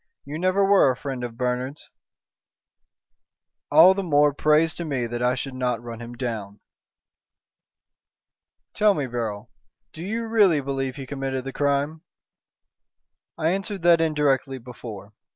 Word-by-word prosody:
"You 145 +3 -6
never 185 +2 +2
were 195 -7 +5
a 130 - 0
friend 135 -3 -5
of 115 -1 -6
Bernard's." 125 +3 -3 1.8
"All 165 +6 +8
the 195 - -2
more 145 -5 +3
praise 155 +3 +3
to 175 - -5
me 135 -7 -2
that 120 +1 -4
I 125 +1 +2
should 135 +1 -5
not 125 -2 -1
run 115 -1 -8
him 120 0 -8
down." 110 -5 -5 2.1
"Tell 210 -1 +3
me, 145 - -1
Beryl, 115 -4 -5 0.4
do 160 - -9
you 225 +5 -3
really 205 -8 +4
believe 135 -1 -3
he 135 -2 -7
committed 135 -1 -4
the 135 0 -6
crime?" 145 +2 0 1.4
"I 160 0 +1
answered 195 -1 -3
that 170 -1 +5
indirectly 145 -4 +1
before. 115 -4 -10
140 Hz, 140 wpm, -24 LUFS, 125-165 Hz, 2.1 s, All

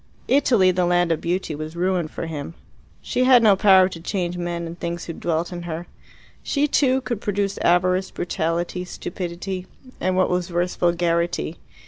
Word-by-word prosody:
Italy, 235 -9 +4
the 180 -1 +1
land 175 -1 +2
of 165 - 0
beauty, 175 -1 -2
was 155 +2 -6
ruined 180 -2 0
for - - -5
him. 160 0 -6 0.5
She 255 - 0
had 250 -2 +6
no 210 -3 +6
power 190 -1 +6
to 175 - -8
change 175 0 -2
men 175 -1 -3
and 170 +1 -8
things 170 0 -4
who 165 - -5
dwelt 170 +2 -2
in 175 - -5
her. 170 0 -5 0.6
She, 290 +1 0
too, 265 -2 +2
could 240 -4 -4
produce 200 -1 -1
avarice, 185 +2 +2
brutality, 175 +1 -2
stupidity 180 +1 -5 0.3
and, 185 0 0
what 185 - +2
was 180 0 -1
worse, 175 +1 -1
vulgarity. 170 -1 0
175 Hz, 170 wpm, -23 LUFS, 170-190 Hz, 0.6 s, had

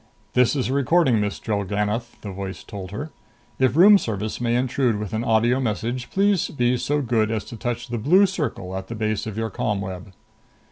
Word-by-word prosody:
"This 125 +2 +3
is 130 - 0
a - - 0
recording, 140 -3 +3
Miss 105 -1 -2
Drellgannoth," 105 +3 -2
the 100 - -6
voice 95 0 -6
told 100 -4 -8
her. 145 +10 -6 0.5
"If 130 0 +3
Room 200 +5 +8
Service 110 - -4
may 120 0 +1
intrude 125 -2 +1
with 105 -2 -5
an 110 +1 -1
audio 115 +3 +2
message, 120 +1 -2
please 200 -2 +2
be 125 -3 +1
so 145 +3 0
good 115 -3 +1
as 110 -1 -2
to - - -9
touch 120 +1 -3
the 120 -1 -3
blue 180 - +5
circle 140 - -3
at 95 0 -5
the 115 - -6
base 110 -1 -2
of 110 -1 -6
your 115 -1 -2
ComWeb." 95 -2 -3
115 Hz, 195 wpm, -23 LUFS, 105-130 Hz, 0.5 s, Room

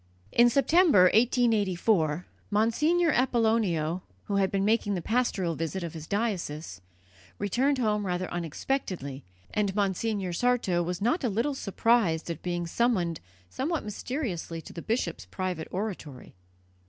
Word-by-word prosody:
In 240 0 +6
September, 290 - +5
1884, 205 -8 +2 0.2
Monsignor 300 +11 +2
Apollonio, 220 - +1 0.2
who 200 - -1
had 195 -1 +2
been 195 0 0
making 210 -2 +2
the 180 - -2
pastoral 220 -7 0
visit 165 +3 -3
of 170 - -5
his 160 -1 -8
diocese, 170 - -3 0.6
returned 255 +8 +1
home 210 -4 0
rather 180 0 -1
unexpectedly, 170 - -3 0.3
and 205 -2 0
Monsignor 200 -1 -1
Sarto 230 -5 +1
was 180 +2 -3
not 260 +9 +1
a 245 - +2
little 230 +8 0
surprised 200 -8 +1
at 165 - -6
being 175 -1 -2
summoned 175 -4 0 0.3
somewhat 300 - -2
mysteriously 210 - -4
to - - -11
the 170 - -6
bishop's 170 - -2
private 180 - -3
oratory. 180 - -5
200 Hz, 130 wpm, -28 LUFS, 170-235 Hz, 0.6 s, In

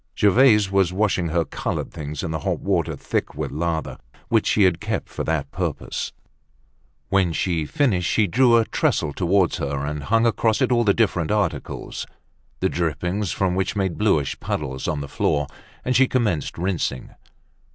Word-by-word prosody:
Gervaise 105 -1 +5
was 95 -3 +3
washing 95 -2 +1
her 85 +1 0
colored - - -4
things 75 -2 -6
in 80 - -3
the 80 - -2
hot - - -2
water - - 0
thick - - -3
with - - -3
lather, 80 +2 -2 0.3
which - - +2
she 105 - +3
had 90 -3 +3
kept - - -2
for - - -4
the 80 -3 -1
purpose. - - -3 1.0
When 95 -3 +2
she 85 0 0
had 75 - -4
finished, 105 - +1
she 110 - +3
drew 120 +5 +4
a 115 - +3
trestle 75 - 0
towards 95 +1 +2
her 70 0 -2
and 75 -1 -4
hung 115 +5 +3
across 115 -1 +2
it 130 -2 +1
all 120 -1 +3
the 100 -3 +3
different 90 -8 +1
articles; 105 -1 -2 0.5
the 95 - +3
drippings 90 +4 -1
from 95 -2 0
which 95 +3 -1
made 95 -4 -1
bluish 90 -10 +1
puddles 65 -3 -3
on 75 -2 -1
the 70 - -5
floor; 75 +1 0 0.4
and 125 - +1
she 135 +1 +5
commenced 105 - -1
rinsing. 85 -8 -2
90 Hz, 175 wpm, -23 LUFS, 80-105 Hz, 1.0 s, Gervaise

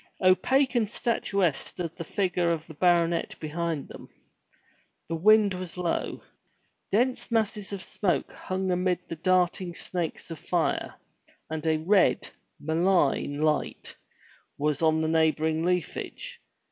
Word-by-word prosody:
Opaque 260 +9 +4
and 230 -4 +1
statuesque 200 - 0
stood 170 -2 -5
the 170 - -5
figure 180 -1 0
of 165 -2 -1
the 160 - -11
baronet 170 +1 +2
behind 160 -1 -3
them. - - -11 1.0
The 165 - -2
wind 210 +3 +5
was 180 -1 -6
low. 175 -2 -2 0.7
Dense 245 +5 +1
masses 215 -3 -1
of 195 -2 -4
smoke 185 -4 -1
hung 185 0 -3
amid 180 0 +1
the - - -3
darting 180 +1 +1
snakes 175 -2 -4
of 160 - -6
fire, 170 0 -1 0.6
and 160 0 -3
a 160 0 +3
red, 165 -5 +3 0.3
malign, 160 -3 +1
light 155 -1 -1 0.6
was 150 0 0
on 160 -1 +3
the - - +1
neighboring 160 0 +2
leafage. 180 - -3
175 Hz, 130 wpm, -27 LUFS, 160-190 Hz, 1.0 s, wind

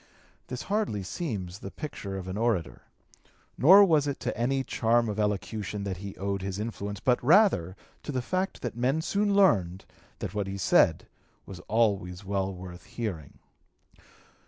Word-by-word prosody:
This 125 - -5
hardly 200 - -1
seems 95 - -5
the 95 - -7
picture 105 -8 -6
of 95 -1 -7
an 95 - -4
orator; 110 -6 -1 0.7
nor 195 +8 +8
was 155 -5 +3
it 140 - -3
to - - -2
any 135 +4 0
charm 115 -1 +1
of 105 0 -3
elocution 105 0 -2
that 95 -2 -3
he 100 +1 -7
owed 100 0 -2
his 95 0 -4
influence, 105 -2 -4
but 125 -2 +1
rather 150 - +4 0.3
to - - -5
the 130 -3 -2
fact 185 +7 -2
that 120 -3 -3
men 130 +6 0
soon 200 +2 +1
learned 95 - +3 0.3
that 100 -3 -5
what 105 -2 -2
he 95 0 -4
said 95 - +3 0.4
was 95 -2 -9
always 100 -4 0
well 95 0 -1
worth 90 -2 -10
hearing. 95 - -6
105 Hz, 160 wpm, -28 LUFS, 95-130 Hz, 0.7 s, nor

